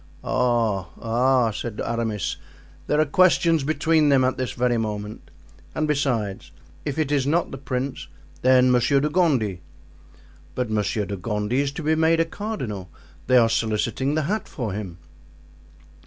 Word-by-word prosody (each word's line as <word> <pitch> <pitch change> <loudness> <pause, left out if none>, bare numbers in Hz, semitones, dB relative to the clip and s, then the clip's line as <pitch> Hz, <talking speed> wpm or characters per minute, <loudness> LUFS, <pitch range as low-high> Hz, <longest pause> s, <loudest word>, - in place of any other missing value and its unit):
"Oh 115 -8 0
oh!" 120 +1 +2
said 110 0 -6
Aramis, 115 -4 -2 0.5
"there 150 - +1
are 155 - +4
questions 165 -1 +3
between 155 +1 +2
them 135 -2 +4
at 130 +1 +1
this 130 -2 -3
very 125 -1 +1
moment. 105 -1 -5 0.5
And 155 - 0
besides, 125 -9 -1 0.3
if 145 -1 -3
it 155 -3 0
is 140 -2 +1
not 165 +4 +1
the 135 - -7
prince, 130 0 -4 0.3
then 130 0 +5
Monsieur 125 +3 +3
de 150 +2 0
Gondy——" 130 - +1 0.9
"But 125 -3 -2
Monsieur 105 0 0
de 100 0 -5
Gondy 105 +6 -1
is 140 -1 -1
to 155 - -6
be 155 +1 +2
made 160 +1 +3
a 165 - +3
cardinal; 130 - -5 0.4
they 130 0 +5
are 115 -2 +6
soliciting 115 +5 0
the 155 - +1
hat 210 +8 -2
for 115 -8 -4
him." 95 -4 -6
125 Hz, 155 wpm, -23 LUFS, 110-150 Hz, 0.9 s, are